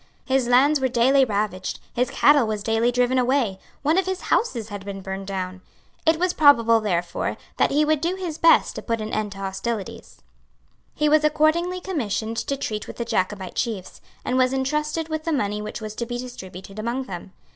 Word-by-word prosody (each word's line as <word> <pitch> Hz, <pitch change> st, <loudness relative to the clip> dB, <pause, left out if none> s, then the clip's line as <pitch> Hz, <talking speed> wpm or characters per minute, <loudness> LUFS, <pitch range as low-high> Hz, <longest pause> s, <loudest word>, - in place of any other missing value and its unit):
His 260 Hz, -2 st, +1 dB
lands 275 Hz, +5 st, +5 dB
were 265 Hz, -, +2 dB
daily 260 Hz, +3 st, +4 dB
ravaged; 205 Hz, -4 st, -2 dB
his 250 Hz, +1 st, 0 dB
cattle 285 Hz, -5 st, +4 dB
were 215 Hz, -1 st, -1 dB
daily 225 Hz, +3 st, +1 dB
driven 250 Hz, +1 st, +2 dB
away; 245 Hz, -6 st, +1 dB, 0.2 s
one 315 Hz, +5 st, +3 dB
of 380 Hz, -, -1 dB
his 375 Hz, -1 st, -2 dB
houses 235 Hz, -, 0 dB
had 205 Hz, -2 st, -6 dB
been 195 Hz, -1 st, -6 dB
burned 190 Hz, 0 st, -6 dB
down. 185 Hz, -1 st, -4 dB, 0.5 s
It 320 Hz, 0 st, +5 dB
was 365 Hz, 0 st, +1 dB
probable, 230 Hz, -7 st, +5 dB
therefore, 175 Hz, -5 st, -2 dB, 0.2 s
that -, -, +3 dB
he 300 Hz, +2 st, +2 dB
would 305 Hz, -1 st, +1 dB
do 345 Hz, +3 st, 0 dB
his 345 Hz, -4 st, -5 dB
best 330 Hz, -, +5 dB
to -, -, -4 dB
put 230 Hz, -1 st, -2 dB
an 215 Hz, 0 st, -5 dB
end 210 Hz, -2 st, -1 dB
to -, -, -13 dB
hostilities. 195 Hz, +2 st, -5 dB, 0.7 s
He 300 Hz, -, +1 dB
was 305 Hz, 0 st, +4 dB
accordingly 315 Hz, +4 st, +2 dB
commissioned 230 Hz, -, -2 dB
to 275 Hz, +4 st, -2 dB
treat 215 Hz, -5 st, -4 dB
with -, -, -9 dB
the 235 Hz, -, -3 dB
Jacobite 190 Hz, -4 st, -2 dB
chiefs, 215 Hz, -7 st, -4 dB, 0.2 s
and 255 Hz, +1 st, +1 dB
was 255 Hz, 0 st, +3 dB
entrusted 300 Hz, +4 st, -1 dB
with 315 Hz, -1 st, -3 dB
the 330 Hz, -, -1 dB
money 210 Hz, -7 st, -1 dB
which 210 Hz, +2 st, -6 dB
was 215 Hz, -1 st, -5 dB
to 235 Hz, -, -3 dB
be 240 Hz, 0 st, -3 dB
distributed 195 Hz, -5 st, -9 dB
among 235 Hz, +4 st, -2 dB
them. 190 Hz, -4 st, -8 dB
240 Hz, 200 wpm, -23 LUFS, 210-295 Hz, 0.7 s, lands